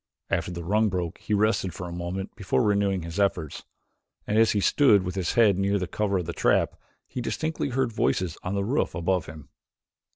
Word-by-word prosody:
After - - 0
the 85 -1 -6
rung 105 +5 +2
broke 90 -3 -3
he 105 - -1
rested 105 -3 +1
for 90 -3 -6
a - - -7
moment 90 +3 -5
before 100 +4 0
renewing 100 -3 +1
his 85 +4 -5
efforts, 85 -7 -1 0.6
and 105 - -1
as 115 0 +4
he 105 - +1
stood 105 -1 +4
with 90 0 -4
his 95 -2 -1
head 105 -5 +4
near 100 +1 +2
the 95 - -2
cover 100 +2 -1
of 90 - -2
the 85 - -4
trap, - - +2 0.3
he 125 - -5
distinctly 155 +4 -2
heard 130 -1 0
voices 90 -5 0
on 95 +2 -3
the 100 - 0
roof 135 +8 0
above 90 -1 0
him. 75 -1 -11
95 Hz, 205 wpm, -26 LUFS, 90-105 Hz, 0.6 s, as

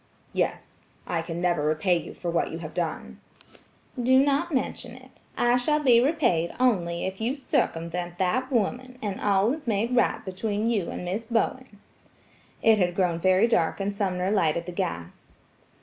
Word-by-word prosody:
"Yes; - - -2 0.3
I 165 - -1
can 165 0 -5
never 175 -3 +1
repay 155 +4 +2
you 170 - -5
for 175 - -4
what 170 - 0
you 165 - -5
have 160 -2 -8
done." 160 - -4 0.8
"Do 260 +2 +4
not 285 +5 +2
mention 255 -3 -3
it. 255 0 -17 0.2
I 240 0 +3
shall 300 +5 +1
be 245 -5 +5
repaid 240 - +1
if - - -12
only 180 -9 +1
you 220 +7 -2
circumvent 175 - -2
that 245 +9 0
woman, 250 +2 -1
and 200 -2 -3
all 205 +3 +2
is 300 -4 -8
made 225 +3 0
right 245 - +1
between 205 +4 -1
you 200 -7 -1
and - - -5
Miss 200 +6 -3
Bowen." 230 -1 -2 0.8
It 220 -1 +5
had 175 -2 +1
grown 180 -3 +1
very 185 +5 +4
dark 175 -8 +1
and 200 +1 -1
Sumner 190 -2 -1
lighted 170 -4 +1
the 180 - -6
gas. 85 - -5
200 Hz, 170 wpm, -26 LUFS, 175-245 Hz, 0.8 s, be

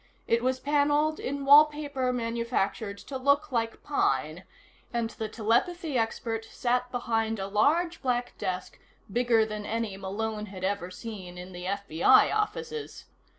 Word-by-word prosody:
It 230 0 +2
was 255 +1 0
paneled 295 +2 +2
in 280 +1 -3
wallpaper 290 -2 +5
manufactured 230 -3 -2
to 265 +5 -7
look 280 +2 +2
like 230 -2 -2
pine, 155 - 0 0.5
and 235 -1 -1
the 220 -2 -5
telepathy 260 +9 0
expert 225 -1 -1
sat 250 +1 -1
behind 225 -2 -1
a 195 - -3
large 310 - +2
black 245 -2 -1
desk 185 0 -4 0.3
bigger 235 -2 +3
than 215 -1 -5
any 220 -2 -3
Malone 210 +2 -3
had 190 -2 -9
ever 190 -2 -1
seen 185 -2 -8
in 180 +1 -8
the 180 0 -8
FBI 195 -4 +4
offices. 430 +1 -3
230 Hz, 140 wpm, -28 LUFS, 205-270 Hz, 0.5 s, wallpaper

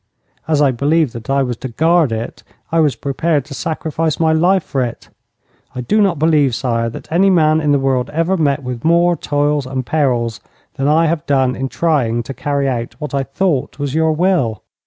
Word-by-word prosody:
As 150 -2 +2
I 140 - +4
believed 145 +2 +1
that 115 +2 -9
I 140 0 +2
was 125 -2 -3
to 130 - -6
guard 160 +3 +2
it, 115 +1 -5 0.3
I 165 - +2
was 150 -6 +2
prepared 140 +3 -1
to 140 - -9
sacrifice 160 0 -2
my 160 -1 +3
life 180 +3 +3
for 135 -2 -2
it. 120 -1 -6 0.7
I 125 - -3
do 210 - +1
not 195 -5 +2
believe, 150 -5 +2
sire, 115 -2 -1
that 115 - -10
any 185 +4 +4
man 160 -3 +3
in 150 -1 +1
the 145 - +4
world 135 -2 0
ever 165 +4 0
met 145 -4 0
with 125 -2 -5
more 170 +1 +3
toils 145 -2 -1
and 130 -1 -4
perils 125 -7 0 0.3
than 135 - -2
I 160 +3 +3
have 160 -1 -1
done 130 -3 +2
in 135 +1 -3
trying 130 -9 0
to 135 - -7
carry 140 0 -1
out 120 -3 -3
what 150 0 -6
I 140 - +1
thought 135 -1 -1
was 145 -2 -3
your 160 0 +2
will.' 155 - 0
145 Hz, 205 wpm, -17 LUFS, 130-160 Hz, 0.7 s, I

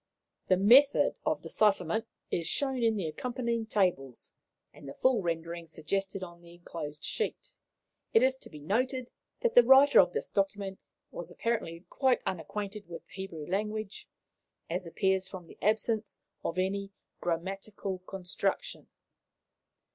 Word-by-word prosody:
The 185 - +4
method 250 +9 +6
of - - 0
decipherment 215 +2 +1 0.2
is 165 -2 -1
shown 270 - 0
in 225 -1 +3
the 195 -5 -2
accompanying 235 +5 -2
tables, 175 - 0 0.4
and 140 - -11
the - - -8
full 255 -4 +3
rendering 170 -1 -3
suggested 195 +5 -3
on 175 -1 -10
the 170 0 -14
enclosed 150 -4 -7
sheet. - - -3 0.6
It 225 - +5
is 260 0 +4
to - - -11
be 155 - -11
noted 250 - -1 0.3
that 475 - +2
the - - +10
writer 265 +4 +7
of - - +6
this - - -3
document 195 -1 -1 0.3
was - - -7
apparently 190 -7 -2
quite 260 -2 +2
unacquainted 200 +3 -4
with 170 -1 -9
the - - -21
Hebrew 190 -6 -6
language, 210 +3 -3 0.6
as 180 +1 -2
appears 190 +2 +1
from 185 -2 -9
the - - -16
absence 220 +1 0 0.2
of 170 - -3
any 195 +2 -1 0.3
grammatical 190 +3 -3
construction.' 195 - -3
195 Hz, 140 wpm, -30 LUFS, 175-230 Hz, 0.6 s, the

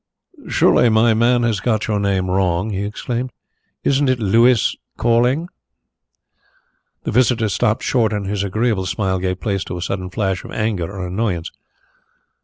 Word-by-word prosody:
"Surely 125 - +4
my 110 +1 +4
man 120 +2 +3
has 115 -4 +1
got 110 +1 0
your 105 -2 0
name 95 -2 0
wrong?" 95 +2 0
he 100 0 -2
explained. 120 +4 -4 0.5
"Isn't 140 0 +2
it 130 - +2
Louis 115 +2 +3 0.2
Calling?" 125 +7 +2 1.6
Mr. 125 +1 +2
Carlyle 110 -2 0
stopped 110 +2 0
short 115 -4 +1
and 105 -2 -2
his 100 0 -2
agreeable 105 -1 0
smile 95 -3 -1
gave 90 0 -2
place 100 -4 -2
to 90 - -5
a - - -6
sudden 95 0 -3
flash 95 -2 -2
of - - -10
anger 105 -6 -2
or 95 -2 -5
annoyance. 90 -2 -2
105 Hz, 155 wpm, -19 LUFS, 95-120 Hz, 1.6 s, Surely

